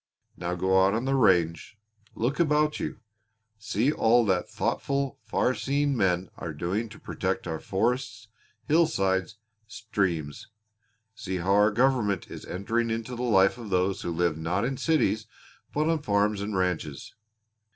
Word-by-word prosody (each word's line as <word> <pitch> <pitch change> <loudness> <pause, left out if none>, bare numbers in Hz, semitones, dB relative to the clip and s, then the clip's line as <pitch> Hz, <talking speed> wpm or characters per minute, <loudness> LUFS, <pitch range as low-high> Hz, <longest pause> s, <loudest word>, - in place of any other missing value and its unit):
Now 90 +1 -3
go 95 +1 +3
out 100 +2 +3
on 115 +3 -1
the 135 - +1
range. 90 - +2 0.4
Look 125 +8 -1
about 150 -2 +2
you. 110 - -5 0.6
See 110 +4 0
all 120 -4 +3
that 95 -3 0
thoughtful, 140 -1 -2
far 130 - +1
seeing 140 +2 0
men 90 -4 0
are 85 - -5
doing 95 +9 -2
to - - -13
protect - - -3
our 80 -1 -3
forests, 115 +2 -2 0.4
hillsides, 110 - +1 0.3
streams; 95 -10 -3 0.7
see 95 -4 -5
how 90 +2 -1
our 105 +1 +5
government 115 -4 +1
is - - -8
entering 115 +5 -1
into 115 +2 -3
the 120 - -5
life 105 -2 +3
of 115 -3 -8
those 95 0 +1
who - - -3
live 85 -2 0
not 90 +7 -1
in 135 +1 -2
cities 120 -10 +1 0.4
but 150 +1 0
on 165 -2 +1
farms 105 -3 +1
and 100 -1 -2
ranches. 85 -6 -2
105 Hz, 150 wpm, -27 LUFS, 95-125 Hz, 0.7 s, our